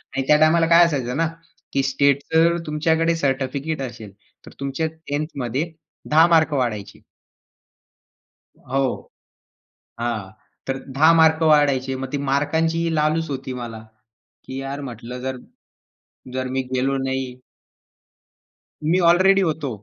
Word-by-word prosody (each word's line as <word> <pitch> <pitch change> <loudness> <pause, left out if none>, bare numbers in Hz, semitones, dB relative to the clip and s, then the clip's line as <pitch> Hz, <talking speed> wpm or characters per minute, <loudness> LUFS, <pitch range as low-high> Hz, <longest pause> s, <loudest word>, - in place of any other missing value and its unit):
आणि 135 - 0
त्या 150 - +6
टायमाला 165 +1 +4
काय 170 +1 +7
असायचं 130 -5 -2
ना. 165 0 +2 0.5
की 135 - +1
स्टेटच 140 +1 +2
जर 170 +1 +4
तुमच्याकडे 160 +2 +1
सर्टिफिकेट 140 0 -2
असेल, 115 -5 -7 0.3
तर - - -12
तुमच्या 140 +3 -2
10th 155 -1 -5
मध्ये 135 +8 -2 0.4
10 160 +2 +6
मार्क 160 -2 +3
वाढायचे. 115 -7 -3 1.5
हां, 135 - -3
हो. 135 - -3 0.9
हां. 115 -5 -3 0.4
तर 135 0 -1 0.2
10 160 +3 +6
मार्क 160 0 +4
वाढायचे. 140 -4 +3
मग 130 0 -6
ती 145 - -1
मार्कांची 160 +4 +1
ही 165 - 0
लालच 155 +1 +1
होती 130 -2 -5
मला, 120 -3 -6 0.6
की 130 - -7
यार 140 +1 -5
म्हटलं 125 -1 -7
जर, 130 0 -4 1.0
जर 130 0 -2
मी 135 - +1
गेलो 135 +2 +1
नाही 130 -1 -3 1.5
मी 170 +4 +2
ऑलरेडी 190 +3 +5
होतो. 155 -5 -1
140 Hz, 135 wpm, -22 LUFS, 130-160 Hz, 1.5 s, काय